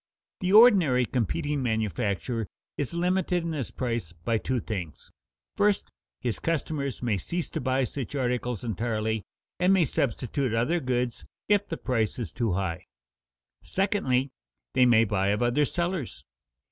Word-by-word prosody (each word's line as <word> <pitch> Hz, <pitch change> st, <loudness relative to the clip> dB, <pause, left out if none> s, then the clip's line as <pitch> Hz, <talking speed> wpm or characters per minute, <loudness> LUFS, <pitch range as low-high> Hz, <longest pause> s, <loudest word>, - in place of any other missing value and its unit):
The 185 Hz, 0 st, 0 dB
ordinary 190 Hz, -, +7 dB
competing 145 Hz, -, -1 dB
manufacturer 110 Hz, -1 st, -1 dB, 0.3 s
is 145 Hz, +3 st, -3 dB
limited 180 Hz, 0 st, +1 dB
in 165 Hz, -, -2 dB
his 145 Hz, -7 st, -3 dB
price 115 Hz, -9 st, -3 dB
by 110 Hz, +7 st, -1 dB
two 130 Hz, +2 st, -1 dB
things: 95 Hz, -9 st, -6 dB, 0.4 s
first, 205 Hz, -1 st, +2 dB, 0.3 s
his 120 Hz, -, -2 dB
customers 150 Hz, -5 st, -2 dB
may 110 Hz, -5 st, +1 dB
cease 170 Hz, -, -3 dB
to -, -, -3 dB
buy 130 Hz, +1 st, +1 dB
such 135 Hz, +2 st, -4 dB
articles 125 Hz, -3 st, -1 dB
entirely 110 Hz, -1 st, -1 dB, 0.4 s
and 180 Hz, +1 st, +4 dB
may 190 Hz, -4 st, +5 dB
substitute 130 Hz, -1 st, -1 dB
other 140 Hz, +10 st, +2 dB
goods 125 Hz, -3 st, -1 dB, 0.2 s
if 205 Hz, -1 st, +3 dB
the 165 Hz, -, -3 dB
price 115 Hz, -5 st, 0 dB
is 120 Hz, -4 st, -4 dB
too 115 Hz, -6 st, -1 dB
high; 90 Hz, -3 st, -2 dB, 0.7 s
secondly, 140 Hz, -10 st, 0 dB, 0.4 s
they 125 Hz, -, +5 dB
may 115 Hz, -2 st, +6 dB
buy 100 Hz, -3 st, 0 dB
of 105 Hz, +4 st, +1 dB
other 120 Hz, +5 st, +3 dB
sellers. 170 Hz, -4 st, -3 dB
125 Hz, 145 wpm, -27 LUFS, 110-165 Hz, 0.7 s, ordinary